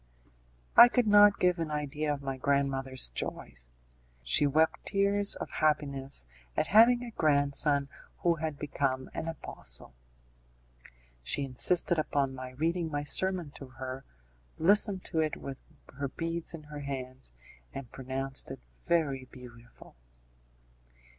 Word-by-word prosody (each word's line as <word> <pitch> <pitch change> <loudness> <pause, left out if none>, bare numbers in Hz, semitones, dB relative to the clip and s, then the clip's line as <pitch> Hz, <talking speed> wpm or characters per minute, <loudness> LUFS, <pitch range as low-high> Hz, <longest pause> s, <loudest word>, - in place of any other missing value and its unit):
I 240 - +11
could 245 0 +1
not 205 -1 +6
give 180 -1 +2
an 165 -2 -2
idea 150 0 -2
of 140 -1 -4
my 135 -1 -3
grandmother's 135 - -1
joy; - - -4 0.7
she 65 - +3
wept 160 +3 +1
tears 200 0 +3
of - - -7
happiness 140 - -1 0.3
at - - +2
having 240 +3 +6
a 240 - -7
grandson 145 -3 +2 0.4
who 170 -1 +3
had 155 -2 -4
become 135 -3 -2
an 160 - -4
apostle. 60 - -5 1.3
She 100 - 0
insisted 160 +6 +1
upon 140 -3 0
my 130 -1 -7
reading 165 +5 -2
my 145 -1 -3
sermon 180 0 0
to 135 - -10
her, 130 +1 -7 0.5
listened 200 +2 +3
to 165 - -1
it 155 -1 0
with 135 -1 -8 0.3
her 140 +1 -3
beads 165 +4 -4
in 155 - -11
her 150 0 -9
hands, 130 - -7 0.4
and 135 -3 -8
pronounced 135 +1 -3
it - - -7 0.2
very 140 -6 0
beautiful. 120 - -15
145 Hz, 135 wpm, -30 LUFS, 135-165 Hz, 1.3 s, I